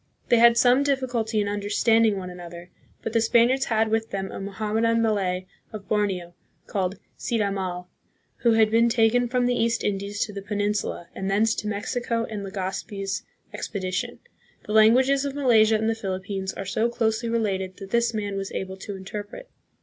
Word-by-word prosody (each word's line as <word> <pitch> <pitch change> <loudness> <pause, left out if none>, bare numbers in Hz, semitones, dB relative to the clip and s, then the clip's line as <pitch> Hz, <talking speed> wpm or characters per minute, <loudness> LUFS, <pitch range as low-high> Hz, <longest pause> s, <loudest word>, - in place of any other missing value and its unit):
They 240 - +5
had 235 0 +7
some 250 +2 +5
difficulty 250 -6 0
in 205 - -1
understanding 205 +1 +2
one 180 -1 -6
another, 175 0 -10 0.3
but 225 - -4
the 230 - +3
Spaniards 240 +4 +3
had 220 -1 +1
with 225 0 0
them 195 -1 -4
a - - -6
Mohammedan 220 +3 0
Malay 195 -5 0 0.3
of 210 -2 -8
Borneo, 190 -5 -1 0.3
called 190 -1 -2 0.2
Cid 235 - -1
Hamal, 190 -3 -2 0.5
who 235 -2 +3
had 220 -1 +4
been 230 +1 +4
taken 235 +1 +3
from 250 0 +1
the 245 - +2
East 230 -1 0
Indies 200 0 -2
to 210 - -10
the 200 - -5
Peninsula 205 -3 -2
and 190 0 -4
thence 215 +3 +3
to 210 - -4
Mexico 230 +3 -2
and 210 -2 -6
Legazpi's 195 +1 -4 0.3
expedition. 185 -3 -3 0.5
The 210 - -4
languages 255 +6 +5
of 280 -1 -3
Malaysia 225 -6 +4
and 220 0 0
the 225 - +2
Philippines 190 -2 -4
are 195 - -6
so 220 +5 0
closely 230 -1 0
related 195 -5 -1
that 195 -1 -10
this 235 0 +2
man 205 -3 -3
was 195 0 -4
able 190 0 -4
to 200 +1 -7
interpret. 205 - -8
215 Hz, 175 wpm, -25 LUFS, 195-230 Hz, 0.5 s, had